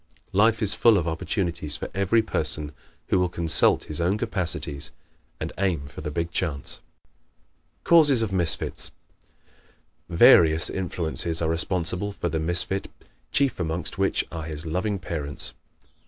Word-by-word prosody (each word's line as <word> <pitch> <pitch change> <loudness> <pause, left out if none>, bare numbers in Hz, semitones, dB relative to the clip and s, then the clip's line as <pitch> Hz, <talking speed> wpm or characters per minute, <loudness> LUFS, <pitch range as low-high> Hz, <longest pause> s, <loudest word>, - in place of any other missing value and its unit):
Life 110 +3 +3
is 105 0 +4
full 115 0 +4
of 85 -2 -2
opportunities 80 -2 -2
for - - -6
every 100 +4 +1
person 75 -8 +3 0.4
who 95 - +2
will 90 -1 +1
consult 85 -3 +3
his 75 +1 -4
own 90 +5 +1
capacities 85 -9 0 0.5
and - - -5
aim 90 -7 -1
for 70 - -10
the 75 - -5
big 85 +2 -3
chance. 75 -8 -2 1.0
Causes 145 -8 +5
of 100 -3 -3
Misfits 85 -4 +1 0.3
¶ - - -37 0.8
Various 80 -2 +5
influences 85 -2 -2
are 80 - -1
responsible 90 +4 -1
for 85 - -3
the 80 0 -2
misfit, 85 +4 0 0.4
chief 140 -6 +1
amongst 80 -1 -3
which - - 0
are 80 - -6
his 80 0 -7
loving 95 +6 -2
parents. 75 -6 -5
85 Hz, 140 wpm, -24 LUFS, 80-100 Hz, 1.0 s, Causes